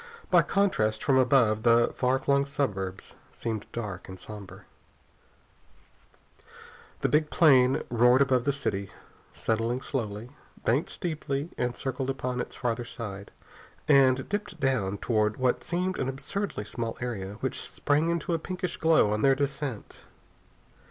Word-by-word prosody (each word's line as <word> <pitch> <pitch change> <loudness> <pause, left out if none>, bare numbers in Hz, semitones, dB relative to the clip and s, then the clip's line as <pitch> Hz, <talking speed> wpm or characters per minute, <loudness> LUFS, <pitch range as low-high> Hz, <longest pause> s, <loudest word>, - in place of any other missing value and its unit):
By - - +7
contrast, 110 - +1
from 135 -2 +4
above, 125 -5 +4
the 120 0 +4
far 130 +1 +2
flung 140 +1 +1
suburbs 95 -9 -3 0.2
seemed 110 -3 -4
dark 105 -6 -6
and 95 0 -9
somber. 105 -2 -10 2.4
The - - +2
big 150 0 +2
plane 135 -5 +5
roared 125 +3 +5
above 130 -3 +1
the 140 - +3
city, 100 -8 -3 0.4
settling 115 +2 -1
slowly; 115 -3 -4 0.3
banked 130 +8 +2
steeply 150 -2 -3
and 125 0 -1
circled 130 0 -3
upon 125 -1 -2
its - - -7
farther 120 -1 -2
side, 100 -4 -7 0.6
and 130 -3 +5
dipped 205 -4 -4
down 120 -8 0
toward 105 -1 0
what 130 -1 +1
seemed 180 +2 -2
an 130 - -1
absurdly 160 - -4
small 115 +1 -4
area, 100 -6 -4
which 130 - -2
sprang 150 +3 0
into 170 0 -1
a 165 - 0
pinkish 180 +1 -4
glow 160 -10 +4
on 105 - -1
their 135 +2 +5
descent. 140 -4 -3
130 Hz, 140 wpm, -28 LUFS, 110-140 Hz, 2.4 s, By